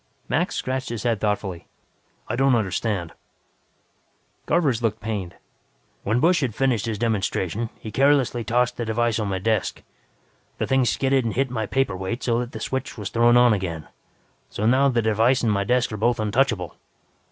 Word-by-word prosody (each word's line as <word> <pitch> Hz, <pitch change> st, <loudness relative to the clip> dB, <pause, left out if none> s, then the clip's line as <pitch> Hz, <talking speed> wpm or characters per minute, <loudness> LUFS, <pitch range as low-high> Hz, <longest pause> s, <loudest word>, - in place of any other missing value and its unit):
Max -, -, 0 dB
scratched 130 Hz, +1 st, -3 dB
his 115 Hz, -3 st, -4 dB
head 115 Hz, -4 st, 0 dB
thoughtfully. 100 Hz, -4 st, -2 dB, 0.6 s
"I 115 Hz, -, -2 dB
don't 135 Hz, 0 st, +3 dB
understand." 100 Hz, -4 st, -1 dB, 1.4 s
Garvers 135 Hz, -9 st, +2 dB
looked 115 Hz, -3 st, -1 dB
pained. 100 Hz, -5 st, -4 dB, 0.7 s
"When 110 Hz, +4 st, 0 dB
Busch 170 Hz, +4 st, +3 dB
had 125 Hz, -6 st, -2 dB
finished 120 Hz, -5 st, +1 dB
his 110 Hz, -2 st, -2 dB
demonstration, 110 Hz, -1 st, -1 dB
he 110 Hz, -, -8 dB
carelessly 135 Hz, -3 st, +2 dB
tossed 120 Hz, +2 st, +1 dB
the 120 Hz, -, -2 dB
device 115 Hz, 0 st, 0 dB
on 105 Hz, -, -1 dB
my 95 Hz, -1 st, -1 dB
desk. 110 Hz, +1 st, -1 dB, 0.7 s
The -, -, -1 dB
thing 135 Hz, -1 st, +2 dB
skidded 135 Hz, +2 st, +1 dB
and 115 Hz, -2 st, -3 dB
hit 135 Hz, 0 st, 0 dB
my 110 Hz, -4 st, -2 dB
paperweight 110 Hz, -3 st, -2 dB
so 120 Hz, -1 st, +1 dB
that 120 Hz, 0 st, -4 dB
the -, -, -7 dB
switch 130 Hz, 0 st, -4 dB
was 105 Hz, -3 st, -4 dB
thrown 120 Hz, +1 st, +4 dB
on 120 Hz, -2 st, +6 dB
again. 85 Hz, -6 st, -4 dB, 0.6 s
So 105 Hz, -, -3 dB
now 130 Hz, +4 st, +4 dB
the 120 Hz, -3 st, +1 dB
device 115 Hz, +4 st, +2 dB
and 115 Hz, -, +2 dB
my 100 Hz, -1 st, +1 dB
desk 125 Hz, +3 st, +1 dB
are 105 Hz, -, -4 dB
both 120 Hz, +3 st, +1 dB
untouchable. 110 Hz, -, 0 dB
115 Hz, 175 wpm, -23 LUFS, 105-125 Hz, 1.4 s, on